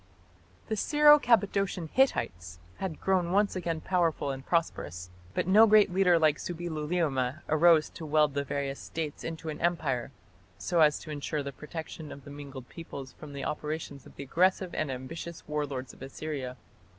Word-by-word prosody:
The 220 Hz, -, -2 dB
Syro 295 Hz, +6 st, +6 dB
Cappadocian 200 Hz, -, +2 dB
Hittites 90 Hz, -, +1 dB, 0.2 s
had 185 Hz, -5 st, -4 dB
grown 185 Hz, -3 st, +1 dB
once 205 Hz, +1 st, +2 dB
again 170 Hz, -3 st, -2 dB
powerful 165 Hz, -6 st, 0 dB
and 135 Hz, 0 st, -6 dB
prosperous, 90 Hz, -, -2 dB, 0.2 s
but -, -, +1 dB
no 210 Hz, +5 st, +7 dB
great 210 Hz, -3 st, +5 dB
leader 180 Hz, -2 st, +4 dB
like 155 Hz, -2 st, +3 dB
Subbiluliuma 155 Hz, -5 st, -2 dB
arose 160 Hz, 0 st, +5 dB
to 165 Hz, -, -8 dB
weld 150 Hz, -1 st, +3 dB
the 140 Hz, 0 st, -1 dB
various 140 Hz, 0 st, -3 dB
States 160 Hz, -2 st, -5 dB
into 165 Hz, -1 st, -5 dB
an 150 Hz, -, -6 dB
Empire, 145 Hz, -8 st, 0 dB, 0.5 s
so 175 Hz, -1 st, 0 dB
as 150 Hz, -1 st, +5 dB
to 155 Hz, -, -8 dB
ensure 145 Hz, 0 st, -3 dB
the 140 Hz, -, -5 dB
protection 155 Hz, +1 st, -8 dB
of 140 Hz, -, -10 dB
the 145 Hz, -, -11 dB
mingled 140 Hz, -3 st, -9 dB
peoples 140 Hz, -5 st, -9 dB
from 150 Hz, -2 st, -11 dB
the 140 Hz, -1 st, -5 dB
operations 150 Hz, -2 st, -4 dB
of -, -, -17 dB
the -, -, -6 dB
aggressive 180 Hz, +5 st, +1 dB
and 155 Hz, -, -1 dB
ambitious 160 Hz, +6 st, -7 dB
war 150 Hz, -1 st, -1 dB
lords 130 Hz, -2 st, -6 dB
of -, -, -18 dB
Assyria. 135 Hz, -2 st, -5 dB
155 Hz, 170 wpm, -29 LUFS, 140-175 Hz, 0.5 s, no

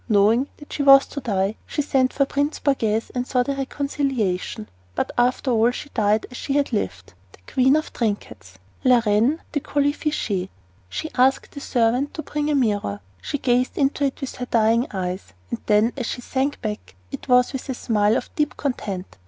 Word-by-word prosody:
Knowing 220 Hz, +5 st, +4 dB
that 295 Hz, -, -12 dB
she -, -, -2 dB
was 275 Hz, -1 st, +8 dB
to 285 Hz, -, -6 dB
die, 200 Hz, -4 st, 0 dB
she 295 Hz, -, -1 dB
sent 260 Hz, -2 st, +2 dB
for 275 Hz, -, +2 dB
Prince 285 Hz, +2 st, -1 dB
Borghese 225 Hz, -6 st, 0 dB
and 250 Hz, 0 st, -2 dB
sought 250 Hz, -1 st, +1 dB
a -, -, +2 dB
reconciliation. 270 Hz, -8 st, -2 dB, 0.3 s
But, -, -, -1 dB
after 250 Hz, +2 st, +1 dB
all, 230 Hz, 0 st, +4 dB
she 285 Hz, +4 st, -6 dB
died 215 Hz, -3 st, +1 dB
as 250 Hz, -, -8 dB
she 275 Hz, -, -3 dB
had 285 Hz, -3 st, +1 dB
lived 95 Hz, -, -3 dB, 0.2 s
"the 90 Hz, -, -17 dB
queen 265 Hz, +2 st, +4 dB
of 310 Hz, 0 st, -2 dB
trinkets" 110 Hz, -, -4 dB, 0.3 s
(la 250 Hz, -2 st, +5 dB
reine 225 Hz, +10 st, +2 dB
des 290 Hz, -, 0 dB
colifichets). 285 Hz, -, -1 dB, 0.4 s
She 315 Hz, -, -4 dB
asked 260 Hz, +1 st, +2 dB
the 285 Hz, -, -8 dB
servant 250 Hz, +2 st, +1 dB
to 310 Hz, -, -4 dB
bring 295 Hz, +1 st, -2 dB
a 300 Hz, -, +2 dB
mirror. 205 Hz, -, 0 dB, 0.2 s
She 290 Hz, -, -3 dB
gazed 250 Hz, -1 st, +1 dB
into 280 Hz, 0 st, +1 dB
it 275 Hz, -, -3 dB
with 270 Hz, -, -5 dB
her 250 Hz, -, -4 dB
dying 230 Hz, +2 st, +3 dB
eyes; 185 Hz, -, -4 dB, 0.2 s
and -, -, -2 dB
then, 215 Hz, +3 st, +3 dB
as 250 Hz, -4 st, -3 dB
she 245 Hz, -, -4 dB
sank 270 Hz, +3 st, -1 dB
back, 210 Hz, -, -5 dB, 0.2 s
it -, -, -7 dB
was 250 Hz, +1 st, +4 dB
with 265 Hz, +1 st, -5 dB
a 260 Hz, -, -1 dB
smile 215 Hz, -1 st, +2 dB
of -, -, -6 dB
deep 300 Hz, -1 st, -1 dB
content. 200 Hz, -, -4 dB
250 Hz, 195 wpm, -23 LUFS, 210-275 Hz, 0.4 s, was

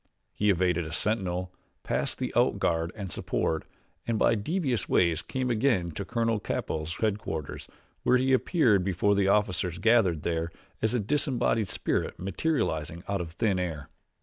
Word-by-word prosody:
He 105 Hz, -, +1 dB
evaded 90 Hz, -2 st, +2 dB
a 80 Hz, -, -7 dB
sentinel, 90 Hz, -2 st, -1 dB, 0.3 s
passed -, -, -1 dB
the -, -, -3 dB
out -, -, +3 dB
guard 85 Hz, 0 st, 0 dB
and 100 Hz, -4 st, -6 dB
support, 80 Hz, -1 st, -1 dB, 0.4 s
and 115 Hz, -1 st, +1 dB
by -, -, +4 dB
devious 125 Hz, -, -1 dB
ways 85 Hz, -2 st, +3 dB
came 130 Hz, -1 st, -2 dB
again 110 Hz, -7 st, +1 dB
to 90 Hz, +6 st, -5 dB
Colonel 115 Hz, +1 st, 0 dB
Capell's 80 Hz, -4 st, -3 dB
headquarters, 105 Hz, -8 st, -3 dB, 0.3 s
where 125 Hz, -, +4 dB
he 130 Hz, +1 st, +2 dB
appeared 125 Hz, -, +3 dB
before 95 Hz, +2 st, +2 dB
the 100 Hz, -1 st, +2 dB
officers 90 Hz, -4 st, +1 dB
gathered 100 Hz, -6 st, +3 dB
there 85 Hz, 0 st, -1 dB, 0.3 s
as 110 Hz, +2 st, +1 dB
a -, -, +2 dB
disembodied 120 Hz, -3 st, +1 dB
spirit -, -, -1 dB
materializing 90 Hz, -, -1 dB
out 100 Hz, -2 st, -1 dB
of 80 Hz, -1 st, -7 dB
thin 100 Hz, -2 st, +1 dB
air. 80 Hz, -6 st, -4 dB
100 Hz, 155 wpm, -28 LUFS, 85-115 Hz, 0.4 s, by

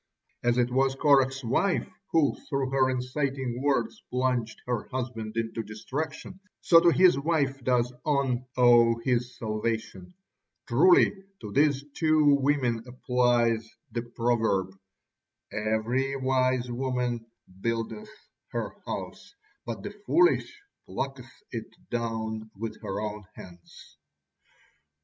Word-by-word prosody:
As 120 Hz, 0 st, +2 dB
it 125 Hz, 0 st, +2 dB
was 135 Hz, +1 st, +2 dB
Korah's 135 Hz, -1 st, +3 dB
wife 175 Hz, +11 st, +1 dB, 0.2 s
who 160 Hz, -4 st, +3 dB, 0.2 s
through 135 Hz, -3 st, -1 dB
her 130 Hz, -1 st, +3 dB
inciting 130 Hz, -1 st, -2 dB
words 145 Hz, +11 st, 0 dB
plunged 125 Hz, -3 st, -1 dB
her 125 Hz, -3 st, -2 dB
husband 120 Hz, -4 st, -4 dB
into 115 Hz, 0 st, -2 dB
destruction, 140 Hz, -, -6 dB, 0.2 s
so 165 Hz, -, +6 dB
to 170 Hz, -, +5 dB
his 175 Hz, -4 st, +5 dB
wife 140 Hz, -3 st, 0 dB
does 125 Hz, -1 st, +1 dB
On 135 Hz, -4 st, +1 dB
owe 120 Hz, -2 st, +6 dB
his 125 Hz, 0 st, 0 dB
salvation. 115 Hz, +10 st, -3 dB, 0.5 s
Truly 165 Hz, +10 st, +5 dB, 0.3 s
to 105 Hz, -, -7 dB
these 140 Hz, +2 st, +2 dB
two 155 Hz, -3 st, +4 dB
women 130 Hz, -5 st, +1 dB
applies 120 Hz, -3 st, +1 dB, 0.2 s
the 115 Hz, -, -2 dB
proverb: 115 Hz, -5 st, 0 dB, 0.8 s
"Every 110 Hz, +6 st, 0 dB
wise 130 Hz, -2 st, +1 dB
woman 125 Hz, -2 st, -2 dB, 0.3 s
buildeth 115 Hz, -, -3 dB, 0.4 s
her -, -, -2 dB, 0.2 s
house: -, -, -6 dB, 0.3 s
but -, -, -5 dB
the -, -, -5 dB, 0.2 s
foolish 355 Hz, +4 st, +2 dB, 0.2 s
plucketh -, -, -5 dB, 0.2 s
it -, -, -5 dB, 0.2 s
down 110 Hz, -2 st, -3 dB
with 110 Hz, +1 st, -6 dB
her 95 Hz, -, -4 dB
own 105 Hz, -1 st, -5 dB
hands." 85 Hz, -1 st, -14 dB
125 Hz, 115 wpm, -27 LUFS, 115-135 Hz, 0.8 s, so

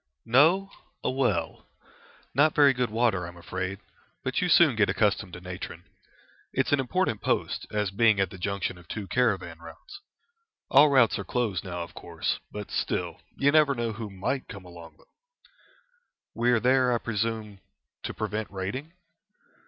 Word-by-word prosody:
"No, 160 Hz, +12 st, +4 dB, 0.3 s
a -, -, 0 dB
well. 130 Hz, -7 st, -1 dB, 0.7 s
Not 145 Hz, +4 st, +3 dB
very 140 Hz, -2 st, +6 dB
good 125 Hz, -1 st, -1 dB
water, 110 Hz, -6 st, +1 dB
I'm 85 Hz, 0 st, -11 dB
afraid, 90 Hz, +2 st, -4 dB, 0.5 s
but -, -, -1 dB
you -, -, 0 dB
soon -, -, +6 dB
get -, -, +3 dB
accustomed 90 Hz, -, +1 dB
to -, -, -7 dB
natron. 90 Hz, -1 st, -7 dB, 0.7 s
It's 130 Hz, -, 0 dB
an 145 Hz, -, +4 dB
important 135 Hz, -, 0 dB
post, -, -, -1 dB
as 105 Hz, -2 st, -1 dB
being 110 Hz, 0 st, +3 dB
at 95 Hz, -2 st, +1 dB
the 95 Hz, -, -10 dB
junction 100 Hz, -1 st, -2 dB
of 85 Hz, -, -17 dB
two 105 Hz, -2 st, -5 dB
caravan 95 Hz, -6 st, 0 dB
routes. 80 Hz, -1 st, -12 dB, 0.7 s
All 145 Hz, +3 st, +7 dB
routes 130 Hz, -7 st, +4 dB
are -, -, -3 dB
closed 105 Hz, -4 st, -1 dB
now, 90 Hz, -2 st, -4 dB
of 85 Hz, -, -11 dB
course, -, -, -3 dB
but 105 Hz, -1 st, -7 dB
still -, -, -2 dB, 0.2 s
you 140 Hz, +1 st, +3 dB
never 150 Hz, -2 st, +4 dB
know 120 Hz, -2 st, -2 dB
who 110 Hz, -1 st, -6 dB
might 100 Hz, +8 st, -3 dB
come 100 Hz, -5 st, -10 dB
along 85 Hz, -2 st, -12 dB
them." -, -, -23 dB, 1.3 s
"We 120 Hz, +1 st, +1 dB
are 120 Hz, -1 st, +4 dB
there, 125 Hz, +1 st, +3 dB
I 120 Hz, -, +2 dB
presume, 110 Hz, -2 st, -3 dB, 0.4 s
to -, -, -4 dB
prevent 110 Hz, 0 st, -3 dB
raiding?" 100 Hz, -, -5 dB
110 Hz, 165 wpm, -27 LUFS, 95-130 Hz, 1.3 s, All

